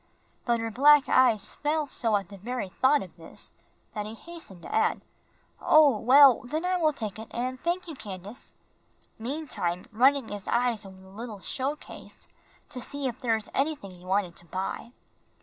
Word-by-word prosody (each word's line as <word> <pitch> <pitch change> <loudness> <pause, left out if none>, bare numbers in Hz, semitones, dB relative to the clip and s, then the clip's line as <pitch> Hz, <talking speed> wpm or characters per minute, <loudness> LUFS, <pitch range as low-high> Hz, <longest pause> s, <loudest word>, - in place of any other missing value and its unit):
But 235 -1 +2
her 225 0 -3
black 285 +4 +6
eyes 225 -6 +3
fell 305 +1 -1
so 230 -5 0
at 195 -3 -2
the 200 - -10
very 240 -1 -4
thought 265 +7 +3
of 180 - -13
this, 165 - -8 0.4
that 210 -1 -4
he 220 - -8
hastened 320 - -11
to - - -8
add, 445 +1 +2 0.6
"Oh, 290 -8 +5
well, 265 +2 +7
then 310 +7 -3
I 365 0 +1
will 315 -3 +3
take 220 -7 -6
it 220 - -8
and 255 +2 -3
thank 350 +3 -2
you, 325 - -6
Candace," 205 -2 -9 0.6
meantime 230 - -3
running 260 +2 +3
his 205 -2 -6
eyes 235 -4 0
over 190 -1 -13
the 190 - -16
little 215 +1 -8
show 265 +9 -2
case - - -12 0.4
to 250 - -6
see 285 +2 -4
if 250 -1 -3
there 230 -3 +1
was 220 -1 -5
anything 275 -8 -1
he 180 -1 -15
wanted 185 -2 0
to 175 - -12
buy. 190 +6 -4
240 Hz, 185 wpm, -27 LUFS, 205-285 Hz, 0.6 s, well